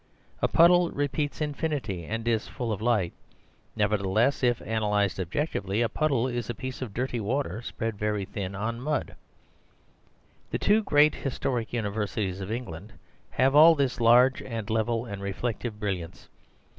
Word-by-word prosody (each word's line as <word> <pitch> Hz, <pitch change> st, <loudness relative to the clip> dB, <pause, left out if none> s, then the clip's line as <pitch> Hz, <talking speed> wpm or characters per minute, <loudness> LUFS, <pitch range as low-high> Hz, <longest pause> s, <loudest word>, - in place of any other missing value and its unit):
A -, -, +3 dB
puddle 175 Hz, +1 st, +5 dB
repeats 145 Hz, +1 st, -2 dB
infinity, 145 Hz, -, -2 dB
and 115 Hz, +4 st, -4 dB
is 115 Hz, -2 st, +1 dB
full 120 Hz, -3 st, -4 dB
of 105 Hz, -, -3 dB
light; 110 Hz, -7 st, +1 dB, 0.6 s
nevertheless, 105 Hz, +4 st, +1 dB
if 120 Hz, -2 st, +2 dB
analyzed 105 Hz, -3 st, 0 dB
objectively, 100 Hz, -, -1 dB
a 115 Hz, -, 0 dB
puddle 140 Hz, -2 st, +1 dB
is 120 Hz, -2 st, -3 dB
a 120 Hz, -, -3 dB
piece 130 Hz, +3 st, -6 dB
of 125 Hz, -5 st, -4 dB
dirty 125 Hz, +2 st, -2 dB
water 115 Hz, +1 st, -2 dB
spread 115 Hz, -3 st, -4 dB
very 105 Hz, -2 st, -1 dB
thin 100 Hz, -1 st, -5 dB
on 115 Hz, +4 st, -3 dB
mud. 150 Hz, +2 st, -2 dB, 1.3 s
The -, -, -1 dB
two 210 Hz, +2 st, +3 dB
great 150 Hz, -6 st, +4 dB
historic 125 Hz, -3 st, -3 dB
universities 105 Hz, -3 st, -2 dB
of 95 Hz, +2 st, -5 dB
England 110 Hz, -4 st, -6 dB, 0.4 s
have 135 Hz, +1 st, +2 dB
all 160 Hz, +3 st, +8 dB
this 140 Hz, -4 st, 0 dB
large 125 Hz, +3 st, +5 dB
and 115 Hz, -4 st, -5 dB
level 115 Hz, +1 st, 0 dB
and 100 Hz, -4 st, -7 dB
reflective 105 Hz, +2 st, -3 dB
brilliance. 95 Hz, -6 st, -4 dB
115 Hz, 150 wpm, -27 LUFS, 105-130 Hz, 1.3 s, all